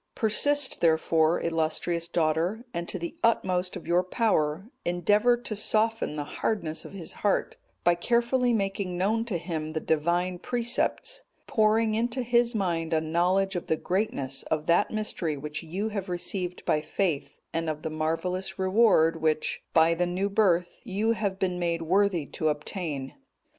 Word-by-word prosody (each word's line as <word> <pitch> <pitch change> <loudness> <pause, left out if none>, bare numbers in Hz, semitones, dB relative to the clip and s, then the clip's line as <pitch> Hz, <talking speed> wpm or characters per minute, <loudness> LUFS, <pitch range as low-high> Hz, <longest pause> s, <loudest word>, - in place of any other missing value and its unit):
Persist, 280 +6 +3
therefore, 160 0 +3
illustrious 165 +1 -1
daughter, 170 +7 0
and 170 0 -4
to - - -2
the 170 -1 -5
utmost 185 -5 +1
of 180 - -8
your 175 +1 +3
power 185 -4 0 0.2
endeavour 205 +7 +3
to 235 -2 -5
soften 220 -3 0
the 150 - -2
hardness 160 0 -2
of - - -10
his 180 -5 -6
heart 205 - 0 0.3
by 175 - +5
carefully 240 +6 +1
making 195 -4 -1
known 220 +5 +1
to 210 -7 -2
him 160 -2 -4
the 160 - -1
Divine 175 +4 0
precepts; 245 - -1 0.2
pouring 220 0 +2
into 240 +3 -1
his 240 0 +2
mind 170 -5 -1
a 160 - +3
knowledge 180 +5 +1
of 175 - -4
the 160 - +1
greatness 155 -10 -1
of 155 -1 -1
that 170 +5 +3
mystery 185 -8 -2
which 150 +1 -5
you 185 +6 -3
have 200 -3 -4
received 180 0 -2
by 150 - +2
faith, 155 -5 -2
and 165 0 -1
of 155 -1 -4
the 160 - -3
marvellous 165 +4 -2
reward 190 -5 +3
which, 155 -1 0
by 165 +1 +5
the 175 +1 0
new 190 +3 -1
birth, 180 -4 +1
you 215 +1 0
have 205 -4 -1
been 180 -2 -1
made 170 -1 -1
worthy 185 -2 +2
to 155 +2 -1
obtain. 150 -3 -4
180 Hz, 160 wpm, -27 LUFS, 160-215 Hz, 0.3 s, by